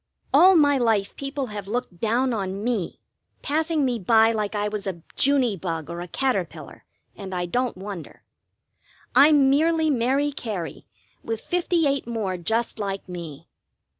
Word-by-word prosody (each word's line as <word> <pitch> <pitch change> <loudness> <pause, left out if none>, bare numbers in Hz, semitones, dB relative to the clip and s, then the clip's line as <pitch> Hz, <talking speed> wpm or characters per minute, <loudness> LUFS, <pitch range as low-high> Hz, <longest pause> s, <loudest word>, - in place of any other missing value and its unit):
All 365 +7 +7
my 285 -4 +4
life 220 -5 +1
people 275 0 -4
have 205 -2 -6
looked 225 -5 -4
down 240 +3 +1
on 195 -1 -3
me, 230 -7 -2 0.4
passing 315 0 0
me 245 -3 -1
by 225 +3 +4
like 215 -1 -2
I 205 0 0
was 210 -1 -4
a 170 -4 -5
Juny 260 - +2
bug 165 -3 -4
or 170 0 -5
a 175 - -6
caterpillar, 195 -5 -3 0.3
and 190 -2 -7
I 180 0 -1
don't 245 +4 -1
wonder. 190 -4 -8 0.9
I'm 285 -1 +6
merely 320 +2 +2
Mary 270 +3 +1
Cary 210 - -6 0.4
with 225 -1 -3
fifty 350 0 0
eight 275 -3 0
more 215 -6 -2
just 220 +7 -1
like 195 -2 -4
me. 170 -5 -8
225 Hz, 155 wpm, -24 LUFS, 195-275 Hz, 0.9 s, All